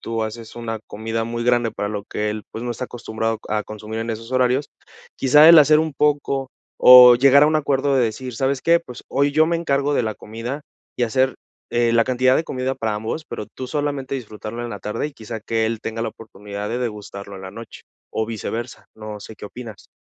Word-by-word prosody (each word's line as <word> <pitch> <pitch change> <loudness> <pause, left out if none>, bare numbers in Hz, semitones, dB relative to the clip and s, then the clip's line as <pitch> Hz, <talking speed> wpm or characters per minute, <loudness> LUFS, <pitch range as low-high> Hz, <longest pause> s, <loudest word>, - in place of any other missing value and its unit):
tú 115 -1 -3
haces 110 +1 -8
una 115 -2 -5
comida 115 +1 -3
muy 115 0 -4
grande 120 -1 +2
para 105 - -4
lo 105 -1 -5
que 105 0 -3
él, 105 0 -5
pues, 115 - -6
no 120 - -3
está 120 +2 -4
acostumbrado 115 -2 -3
a 105 0 0
consumir 110 +1 -6
en 115 +1 -3
esos 115 +2 -6
horarios, 130 +2 +1 0.5
quizá 150 +4 +6
el 170 -1 +10
hacer 150 +1 +6
un 160 -2 -1
poco, 140 -2 0 0.3
o 125 -1 +10
llegar 140 +2 +6
a - - +7
un 155 0 +2
acuerdo 140 -1 +1
de 125 - +3
decir: 120 +3 -4
"¿Sabes 135 +1 0
qué? 170 0 +4
Pues, 125 -7 -11
hoy 140 +1 +1
yo 155 +2 +4
me 170 0 +1
encargo 145 -3 0
de 125 - +2
la 110 -1 -2
comida", 115 +6 -6 0.4
y 120 - +2
hacer 130 +3 +1 0.3
eh, 120 -1 +2
la 115 0 +5
cantidad 130 0 +2
de 160 - +1
comida 130 -2 -2
para 110 -2 -2
ambos, 110 +9 -4
pero - - -5
tú 130 +4 -8
solamente 145 -1 -3
disfrutarlo 115 -1 -6
en 120 - -5
la 105 - -6
tarde, 105 +7 -3
y - - -15
quizá, 110 -2 -7
que 110 0 0
él 115 0 -3
tenga 115 0 -4
la 115 - -1
oportunidad 105 -2 -8
de 120 - -2
degustarlo 100 -4 -6
en 95 - -10
la 95 - -7
noche 115 +3 -11 0.3
o 110 - -1
viceversa. 115 +2 -5
No 110 -1 -8
sé 110 +1 -11
qué - - -10
opinas. 110 -1 -10
120 Hz, 225 wpm, -21 LUFS, 110-135 Hz, 0.5 s, el